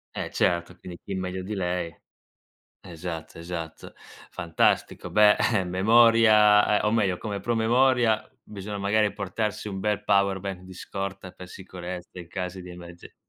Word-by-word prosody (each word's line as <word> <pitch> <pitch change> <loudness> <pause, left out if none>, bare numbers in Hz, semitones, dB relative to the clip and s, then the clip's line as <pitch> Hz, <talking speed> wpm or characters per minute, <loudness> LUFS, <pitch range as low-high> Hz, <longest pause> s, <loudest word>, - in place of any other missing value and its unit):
Eh, - - -4
certo, 85 0 0
quindi 90 -1 -10
chi 100 - -6
meglio 95 0 -4
di 105 - -5
lei 90 -3 -2 0.9
esatto, 85 -2 -7
esatto. 85 -1 -7 0.4
Fantastico. 85 -1 0
Beh, 105 -1 +6 0.2
eh 100 -3 +2
memoria 105 +2 +5
ehm, - - -2
o - - +1
meglio, 100 -5 +1
come 105 -3 -5
promemoria, 120 +1 +2 0.2
bisogna, 105 0 -7
magari, 105 +1 +1
portarsi 105 +1 -3
un 95 -2 -5
bel 105 +1 -1
power 100 -2 +2
bank 95 -1 -6
di 95 0 -12
scorta 95 0 -6
per 90 - -12
sicurezza, 90 -1 -8
in 85 - -9
casi 90 +1 -5
di 90 - -11
emerge 85 0 -12
95 Hz, 150 wpm, -26 LUFS, 90-105 Hz, 0.9 s, Beh